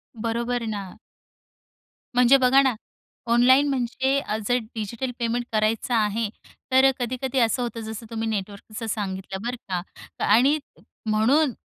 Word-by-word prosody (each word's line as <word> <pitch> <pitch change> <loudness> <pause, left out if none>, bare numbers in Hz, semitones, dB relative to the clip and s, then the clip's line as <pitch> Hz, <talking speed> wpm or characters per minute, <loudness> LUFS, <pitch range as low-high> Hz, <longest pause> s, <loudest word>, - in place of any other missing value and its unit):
बरोबर 235 +1 -2
ना. 200 -3 -5 1.2
म्हणजे 250 +2 +6
बघा 265 +1 +5
ना, 265 -3 +2 0.6
ऑनलाईन 260 +4 +5
म्हणजे 265 +1 0
अ, 215 -5 -3
जर 245 0 +3 0.2
डिजिटल 230 +4 -3
पेमेंट 235 +1 -1
करायचं 220 +2 0
आहे 215 0 +1 0.4
तर 260 +1 +6
अ, 270 - +6
कधी-कधी 255 +2 -2
असं 230 +2 +2
होतं, 235 -1 -3
जसं 220 +1 -7
तुम्ही 225 -1 -3
नेटवर्कचं 210 +2 -5
सांगितलं 190 -2 -4
बरं 250 - -2
का 180 -2 -1 0.4
आणि 260 +8 +5 0.5
म्हणून 250 +6 +3
235 Hz, 135 wpm, -24 LUFS, 215-255 Hz, 1.2 s, म्हणजे